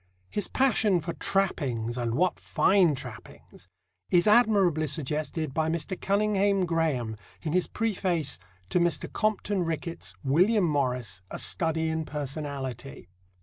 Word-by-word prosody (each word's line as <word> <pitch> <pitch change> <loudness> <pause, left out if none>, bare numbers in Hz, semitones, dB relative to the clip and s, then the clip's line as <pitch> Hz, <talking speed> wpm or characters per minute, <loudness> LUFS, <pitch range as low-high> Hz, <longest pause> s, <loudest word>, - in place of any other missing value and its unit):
His 205 - -1
passion 220 -8 +2
for 170 +1 -4
trappings 135 - -1
and 120 -2 -1
what 180 +4 +1
fine 185 -6 +3
trappings! 95 - -11 0.4
is 175 -1 +4
admirably 200 -8 +4
suggested 155 +1 -2
by 160 +1 0
Mr. 165 +3 -2
Cunninghame 200 -1 +1
Graham 155 -10 0 0.3
in 155 -2 -2
his 180 0 +2
preface 180 - -1 0.3
to 180 - +2
Mr. 175 0 0
Compton 210 -3 0
Rickett's 160 - -4
William 185 +9 +3
Morris: 125 - -1
a - - -5
Study 160 -2 0
in 160 0 -1
Personality. 135 - -5
160 Hz, 125 wpm, -27 LUFS, 140-190 Hz, 0.4 s, is